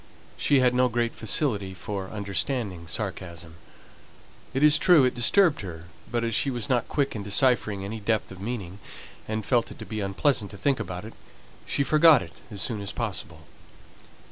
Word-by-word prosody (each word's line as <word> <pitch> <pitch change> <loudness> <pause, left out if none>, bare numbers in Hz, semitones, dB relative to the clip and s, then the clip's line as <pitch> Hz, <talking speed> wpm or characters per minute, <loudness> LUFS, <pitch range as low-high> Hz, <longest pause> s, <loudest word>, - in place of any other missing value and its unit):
She 140 -2 +3
had 125 -1 +3
no 125 0 +3
great 120 0 0
facility 105 -5 0
for 95 +1 -5
understanding 100 - -3
sarcasm; 85 -3 -5 0.9
it 135 - -1
is 150 0 +6
true 165 -3 +6
it 125 - +1
disturbed 150 - +3
her, 85 -3 -8 0.2
but 120 0 -1
as 115 -1 -1
she 140 - +1
was 120 -4 -3
not 125 -4 +1
quick 140 -5 -1
at 105 - -4
deciphering 100 -1 +1
any 110 +3 -5
depth 110 0 -1
of 95 -1 -10
meaning, 100 -4 -5 0.5
and 110 -1 -3
felt 120 -3 +1
it - - -12
unpleasant 105 +3 -1
to 100 - -11
think 140 +5 +1
about 90 +2 -5
it, 110 - -9 0.5
she 140 - +1
forgot 155 +2 +6
it 80 - -12 0.2
as 100 -3 -1
soon 110 -4 -2
as 100 - -5
possible. 90 -8 -5
110 Hz, 170 wpm, -26 LUFS, 95-125 Hz, 0.9 s, is